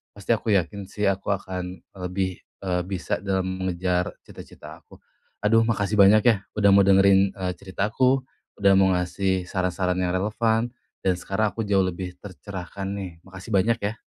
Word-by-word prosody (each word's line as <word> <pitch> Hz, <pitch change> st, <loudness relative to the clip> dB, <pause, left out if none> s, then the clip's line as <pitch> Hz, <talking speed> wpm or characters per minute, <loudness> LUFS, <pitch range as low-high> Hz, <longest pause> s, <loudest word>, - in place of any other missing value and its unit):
pasti 100 Hz, +2 st, -3 dB
aku 110 Hz, 0 st, -2 dB
yakin 100 Hz, +2 st, -1 dB
sih, 105 Hz, 0 st, -1 dB
aku 100 Hz, +1 st, 0 dB
akan 90 Hz, -2 st, -4 dB, 0.2 s
lebih, 95 Hz, 0 st, -3 dB, 0.2 s
eee, 90 Hz, -2 st, 0 dB
bisa 95 Hz, -2 st, -2 dB
dalam 95 Hz, -1 st, 0 dB, 0.2 s
mengejar 90 Hz, 0 st, -1 dB, 0.2 s
cita-cita -, -, -12 dB
aku. -, -, -17 dB, 0.4 s
Aduh, 115 Hz, +2 st, +4 dB
makasih 105 Hz, -2 st, 0 dB
banyak, 100 Hz, +2 st, +7 dB
ya, 115 Hz, -, +6 dB, 0.2 s
udah 100 Hz, -1 st, +4 dB
mau 100 Hz, -, +6 dB
dengerin, 95 Hz, 0 st, +5 dB
eee, 90 Hz, -2 st, -3 dB
cerita 95 Hz, +1 st, -2 dB
aku, 130 Hz, +2 st, +3 dB, 0.4 s
udah 100 Hz, -1 st, +5 dB
mau 95 Hz, -1 st, +4 dB
ngasih 90 Hz, 0 st, -1 dB
saran-saran 90 Hz, 0 st, -1 dB
yang 90 Hz, -1 st, 0 dB
relevan, 110 Hz, +4 st, 0 dB, 0.3 s
dan 95 Hz, -, +3 dB
sekarang 100 Hz, +4 st, 0 dB
aku 115 Hz, -, -2 dB
jauh 100 Hz, -1 st, +3 dB
lebih 90 Hz, 0 st, -4 dB
tercerahkan, 95 Hz, -1 st, -7 dB
nih. 100 Hz, -2 st, -5 dB
Makasih 95 Hz, +3 st, -11 dB
banyak, 115 Hz, +5 st, +2 dB
ya. 105 Hz, +2 st, -3 dB
95 Hz, 165 wpm, -24 LUFS, 90-105 Hz, 0.4 s, banyak